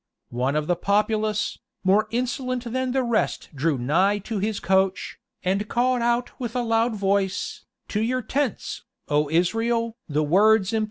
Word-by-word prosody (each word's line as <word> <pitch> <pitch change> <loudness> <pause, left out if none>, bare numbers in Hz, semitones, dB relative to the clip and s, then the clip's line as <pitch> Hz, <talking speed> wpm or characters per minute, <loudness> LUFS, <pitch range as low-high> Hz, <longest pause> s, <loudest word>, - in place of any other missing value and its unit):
One 125 +4 0
of 150 0 0
the 175 +2 +1
populace, 210 +3 0 0.2
more 200 +3 +3
insolent 250 +1 -2
than 260 0 0
the 265 0 +1
rest 235 -2 -1
drew 145 +1 0
nigh 175 +11 +2
to 220 -4 -2
his 210 +1 -1
coach, 190 +1 0 0.2
and 195 +3 0
called 245 +2 +1
out 240 +1 0
with 240 -2 -4
a 245 - +1
loud 225 0 +1
voice, 195 -1 -1 0.2
"To 210 - -1
your 250 +3 0
tents, 265 0 -2 0.3
O 150 0 +2
Israel!" 225 +7 +1
215 Hz, 145 wpm, -24 LUFS, 185-240 Hz, 0.3 s, more